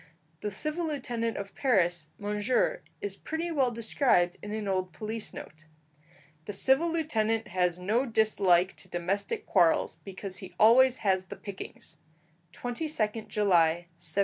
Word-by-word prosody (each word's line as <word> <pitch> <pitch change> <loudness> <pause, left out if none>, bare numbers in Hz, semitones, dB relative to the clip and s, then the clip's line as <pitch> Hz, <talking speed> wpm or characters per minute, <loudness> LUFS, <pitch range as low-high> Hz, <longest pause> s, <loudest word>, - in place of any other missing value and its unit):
The 210 - -2
civil 305 - -2
lieutenant 240 -6 -2
of 200 0 -6
Paris, 175 - +1
Monsieur, 210 +4 0 0.2
is 200 -1 -3
pretty 325 +7 -4
well 270 -5 +2
described 225 -6 +2
in 210 - -7
an 215 -1 -3
old 185 -2 -1
police 220 0 -5
note: 155 0 -11 0.8
"The 205 - -5
civil 270 - +3
lieutenant 225 -9 0
has 180 -1 +1
no 215 +9 0
dislike 195 -5 +3
to - - -11
domestic 190 +4 -2
quarrels, 170 -3 +3
because 190 +1 -6
he 185 -2 -10
always 250 +4 +6
has 190 -1 +2
the - - -8
pickings" 190 -4 -9 0.5
(22nd 235 -4 -2
July 175 -6 +4 0.3
1704). 165 0 -6
210 Hz, 140 wpm, -29 LUFS, 185-245 Hz, 0.8 s, always